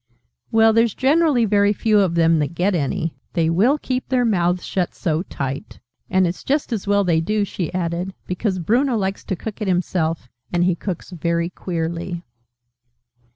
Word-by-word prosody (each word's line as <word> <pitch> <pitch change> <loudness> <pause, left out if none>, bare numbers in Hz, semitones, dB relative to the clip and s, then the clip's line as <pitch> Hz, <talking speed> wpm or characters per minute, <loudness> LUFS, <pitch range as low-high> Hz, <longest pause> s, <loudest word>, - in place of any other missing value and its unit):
"Well, 225 0 +5
there's 230 -1 +3
generally 285 -3 +3
very 205 0 +3
few 215 0 +2
of 185 -4 +2
them 165 -1 +4
that 150 +3 -2
get 190 +4 +1
any. 160 0 -1 0.2
They 165 -1 +2
will 225 - +3
keep 255 -3 -3
their 250 -2 +2
mouths 180 -4 +1
shut 180 -2 -2
so 160 -1 -1
tight! 140 -6 -5 0.3
And 185 0 +3
it's 175 +1 -3
just 280 -2 0
as 205 -3 -3
well 200 0 +3
they 165 -3 +2
do," 210 +4 0
she 180 -3 -4
added, 180 +1 -2
"because 185 +1 -1
Bruno 235 - +1
likes 195 -1 -2
to 190 - -2
cook 220 +4 -7
it 210 - -1
himself: 170 -5 0 0.2
and 175 0 +2
he 180 0 +3
cooks 175 +1 -5
very 170 0 -1
queerly. 170 0 -4
185 Hz, 175 wpm, -21 LUFS, 170-215 Hz, 0.3 s, Well